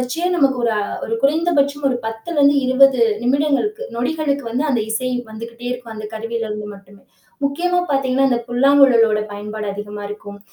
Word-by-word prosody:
வெச்சே 325 +8 -1
நமக்கு 270 -4 +3
ஒரு 230 - +2 0.3
குறை 225 0 -3
குறைந்த 320 +5 +2
பட்சம் 285 0 +1
ஒரு 255 - 0
10ல 225 +9 -5
இருந்து 285 0 +5
20வது 260 +1 +5 0.2
நிமிடங்களுக்கு, 295 - 0
நொடிகளுக்கு 280 +2 -1
வந்து 255 +6 -1
அந்த 245 -4 +1
இசை 255 +3 -1 0.2
வந்துகிட்டே 230 +2 -9
இருக்கும். 245 -2 -6
அந்த 215 0 -7
கருவியில 225 +1 -3
இருந்து 210 0 -5
மட்டுமே. 195 0 -17 0.4
முக்கியமா 355 +6 +1
பாத்தீங்கன்னா, 270 -1 +2
இந்த 245 - +1
புல்லாங்குழலோட 245 -4 +4
பயன்பாடு 210 +1 -6
அதிகமா 205 +1 -7
இருக்கும். 205 -1 -9
250 Hz, 160 wpm, -19 LUFS, 220-280 Hz, 0.4 s, இருந்து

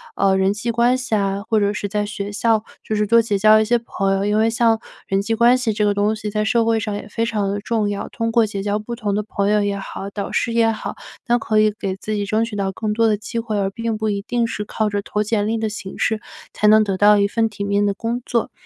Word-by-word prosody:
呃， 190 -1 +2
人 190 +1 +2
际 215 +3 -4
关 235 +2 +3
系 255 -3 -2
啊， 200 -1 0
或 220 - +3
者 205 0 +1
是 205 - -3
在 210 +1 -1
学 205 -1 -5
校 220 +1 +1 0.2
就 215 - -2
是 210 0 +1
多 230 +2 +5
结 225 -3 0
交 215 +1 +6
一 215 - +2
些 240 +2 +2
朋 195 -4 -1
友， 195 0 0
因 210 +1 +1
为 220 +1 +3
像 230 -1 +2 0.3
人 195 0 0
际 225 - -1
关 240 +2 +5
系 240 -4 -1
这 210 0 0
个 205 -1 +2
东 205 +2 +1
西 215 -1 -5
在 210 +1 -1
社 230 +1 +2
会 225 0 +2
上 210 -1 -3
也 205 - -7
非 225 +2 -2
常 210 -4 -1
地 200 +1 -2
重 215 0 -1
要。 200 0 -4
通 230 -1 -2
过 230 -1 +4
结 200 -2 -4
交 205 +1 -1
不 215 +3 -6
同 210 -4 -2
的 210 - -1
朋 200 -1 -1
友 210 0 +3
也 200 -1 -1
好、 195 0 -7
导 200 -1 -5
师 235 - 0
也 230 -1 +3
好， 215 - -5 0.3
那 240 -1 +2
可 215 -1 +1
以 215 0 +3
给 190 -1 -2
自 215 +2 -5
己 205 -1 -2
争 220 +1 +1
取 230 -2 -7
到 195 -1 -1
更 210 +2 -3
多 225 +1 +3
的 215 -1 +2
机 220 +3 -5
会， 225 -2 -3
而 195 -1 0
并 230 +1 -3
不 220 0 -2
一 200 -1 -1
定 235 +3 -1
是 215 -2 -3
靠 215 +1 -1
着 205 -1 -1
投 210 +1 -2
简 210 -1 0
历 225 +1 0
的 220 0 -1
形 205 -3 -7
式 220 -1 0 0.3
才 210 - +1
能 215 +1 +6
得 195 -2 -2
到 205 +1 +6
一 200 0 +3
份 225 +2 0
体 205 -1 -6
面 200 0 +1
的 200 - -1
工 235 +3 -3
作。 235 -2 -1
215 Hz, 310 characters per minute, -20 LUFS, 205-225 Hz, 0.3 s, 交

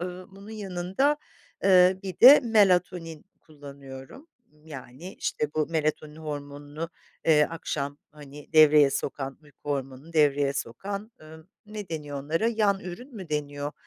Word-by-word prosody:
ııı, 180 +1 -6
bunun 195 +2 -13
yanında, 200 +7 -1 0.5
eee, 185 -1 +5
bir 190 -3 -7
de 270 +4 +10
melatonin 180 - +1 0.2
kullanıyorum. 140 - -12 0.3
Imm, 150 +1 -26
yani, 140 +5 -10
işte, 150 - -2
bu 155 -1 +1
melatonin 155 -1 -2
hormonunu, 145 +1 -7 0.4
eee, 150 -2 +5
akşam, 145 -3 -4
hani, 145 0 -13
devreye 150 -2 +6
sokan, 135 -1 -4
uyku 145 0 -10
hormonunu 135 +3 -5
devreye 145 -3 +3
sokan, 200 - -6
ımm, 160 +2 -14 0.2
ne 210 -2 -8
deniyor 145 -3 -5
onlara, 165 +10 0
yan 210 -4 +1
ürün 220 +10 -9
mü 185 -4 -8
deniyor? 145 -1 -3
155 Hz, 135 wpm, -26 LUFS, 145-185 Hz, 0.5 s, de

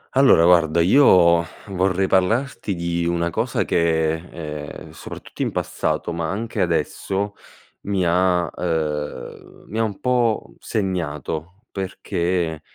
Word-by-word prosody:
Allora 135 -11 +6
guarda, 85 -2 +4
io 85 -4 +6 0.3
vorrei 95 0 +1
parlarti 100 +3 +1
di 85 0 -2
una 85 0 0
cosa - - -1
che, 80 -2 +2
ehm, 75 -3 -7
soprattutto - - -9
in - - 0
passato, - - -2
ma 85 -1 -2
anche 110 +4 -3
adesso, 100 +1 -1 0.5
mi 100 -2 +1
ha 90 0 +2
ehm, 80 -4 -4
mi 110 - -4
ha - - +3
un 105 -3 -3
po' 120 -3 0
segnato, 90 - -3
perché, 85 -4 -2
90 Hz, 120 wpm, -22 LUFS, 85-95 Hz, 0.5 s, Allora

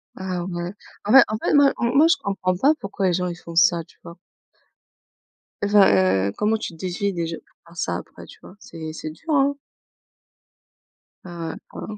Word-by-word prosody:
Ah, 185 -2 -4
ouais, 175 0 -5 0.3
en 205 - 0
fait 270 +1 +9
en 215 - -3
fait, - - -1
moi 285 -1 +5
moi, 260 +6 +4
je 335 - +3
comprends 185 -2 -1
pas 280 - +3
pourquoi 195 -1 -2
les 180 - +2
gens, 180 +1 -1
ils 175 - -4
font 170 -1 -11
ça. 170 0 +4
Tu - - -24
vois? 170 0 -10 1.5
Enfin, 205 -1 +5 0.4
heu, 100 - -2
comment 215 +1 +1
tu 215 - -6
déduis 185 +4 -3
déjà 165 -2 -3
pour - - -21
faire 170 - -17
ça, 85 - -1
après, - - -11
tu - - -16
vois? 185 - -14
c'est 160 -5 -8
c'est 155 0 -6
dur, 170 - -16
hein. 280 0 +3 1.7
Ah 170 -2 -6
ouais. - - -6 0.2
Waouh. 215 - -7
185 Hz, 190 wpm, -22 LUFS, 170-210 Hz, 1.7 s, fait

